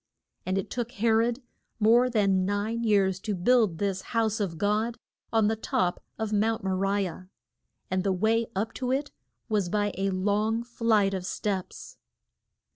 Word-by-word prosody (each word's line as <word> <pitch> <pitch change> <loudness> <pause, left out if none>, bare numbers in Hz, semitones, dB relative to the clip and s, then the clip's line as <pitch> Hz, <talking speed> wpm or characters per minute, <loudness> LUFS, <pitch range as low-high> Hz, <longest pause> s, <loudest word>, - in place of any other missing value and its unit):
And 185 +1 0
it 195 - -3
took 240 -1 -3
He 225 +3 -1
rod 230 +3 +2 0.4
more 235 +4 +5
than 200 -5 +2
nine 205 +4 -1
years 195 -4 +2
to 210 +1 -3
build 210 -2 +3
this 195 -1 -1 0.2
House 220 -1 +1
of 185 -6 -2
God 210 +5 0 0.3
on 225 -2 +3
the 220 - +1
top 180 -4 -1
of 220 -1 -3
Mount 220 +1 +1
Mo 190 - -1
ri 195 +1 +1
ah. 180 +2 -9 0.7
And 185 0 +1
the 195 - +1
way 220 +5 +1
up 215 +4 -1
to 255 0 0
it 280 +2 -1 0.4
was 205 -5 0
by 205 +1 0
a 195 0 +1
long 210 +4 0
flight 225 -4 +1
of 190 -2 -3
steps. 190 0 -4
210 Hz, 170 wpm, -27 LUFS, 195-225 Hz, 0.7 s, more